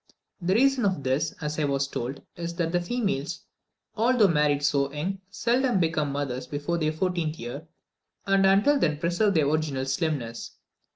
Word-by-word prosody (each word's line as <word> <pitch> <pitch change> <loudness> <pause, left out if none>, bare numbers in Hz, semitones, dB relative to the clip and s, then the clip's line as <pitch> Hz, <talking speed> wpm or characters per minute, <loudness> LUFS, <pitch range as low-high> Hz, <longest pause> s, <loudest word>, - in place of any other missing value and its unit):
The 185 +3 +1
reason 270 +1 +3
of 190 -8 0
this, 135 +5 0
as 150 0 -3
I 150 - +2
was 140 -1 0
told, 135 +1 -5
is 170 0 -5
that 170 -2 -1
the 175 0 +1
females, 195 - -2 0.5
although 235 -1 +4
married 150 -3 +2
so 140 -1 +1
young, 175 +7 -3
seldom 240 +1 +1
become 160 -4 0
mothers 140 -3 -3
before 150 +4 -2
their 155 -1 +1
fourteenth 165 -1 -1
year, 130 +7 -7 0.6
and 195 0 +3
until 205 +10 +4
then 155 - +1
preserve 175 +6 +1
their 155 -3 +3
original 145 -3 0
slimness. 135 -4 -2
160 Hz, 165 wpm, -26 LUFS, 145-195 Hz, 0.6 s, although